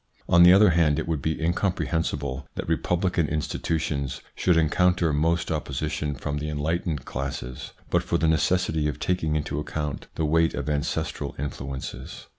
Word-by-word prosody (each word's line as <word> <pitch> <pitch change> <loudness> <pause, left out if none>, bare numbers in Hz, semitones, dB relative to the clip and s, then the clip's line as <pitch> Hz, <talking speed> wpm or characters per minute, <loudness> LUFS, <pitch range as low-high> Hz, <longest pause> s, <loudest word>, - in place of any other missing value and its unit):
On 85 - +6
the 90 0 +9
other 100 0 +7
hand, 80 -3 +3
it - - -2
would 80 -4 -1
be 80 +3 -1
incomprehensible 80 -5 -1
that - - -4
republican 90 -2 +1
insti 75 0 -2
tutions 75 -4 -2
should 90 -2 +2
encounter 85 0 +3
most 80 +3 +1
opposition 75 0 -2
from 70 +3 -3
the 75 +1 -3
enlightened 75 0 -2
classes, 65 -1 -5 0.2
but - - +3
for - - 0
the 80 - +1
necessity 80 0 +2
of 75 - -3
taking 80 -4 0
into 75 -1 -2
account 75 -1 -4
the 80 - 0
weight 80 +2 +2
of - - -4
ancestral 80 +2 -2
influences. 70 -1 -6
75 Hz, 160 wpm, -25 LUFS, 75-85 Hz, 0.2 s, the